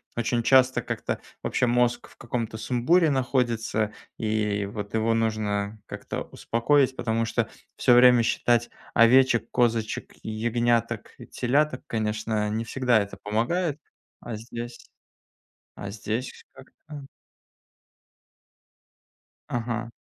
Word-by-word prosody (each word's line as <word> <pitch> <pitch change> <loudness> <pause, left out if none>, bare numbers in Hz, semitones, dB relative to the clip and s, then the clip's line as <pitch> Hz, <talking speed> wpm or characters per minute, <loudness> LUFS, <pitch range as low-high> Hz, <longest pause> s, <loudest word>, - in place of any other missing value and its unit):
очень 120 0 0
часто 130 0 +4
как-то - - -3 0.2
вообще - - 0
мозг 120 0 +1
в - - -20
каком-то 115 -2 -4
сумбуре 125 +10 +2
находится, 120 -5 0 0.3
и 105 -2 0
вот 105 -1 -6
его 115 +1 +2
нужно 110 -2 -1
как-то - - -5
успокоить, 130 +3 +1
потому 115 0 -1
что 115 0 -1 0.3
всё 125 - +4
время 125 -1 +7
считать 120 +1 +1 0.2
овечек, 120 0 +5
козочек, 115 -3 0
ягняток 115 0 -1
и - - -11
теляток, 135 +2 0
конечно, 110 -1 -1
не 110 +2 -1
всегда 125 -1 +2
это 100 0 -6
помогает. 145 - -1 0.4
А 120 - -6
здесь 120 +2 -7 1.0
а 100 -1 -6
здесь 115 +4 -5
как-то 145 +1 -12 2.4
Ага. 120 -1 -3
115 Hz, 110 wpm, -26 LUFS, 110-125 Hz, 2.4 s, время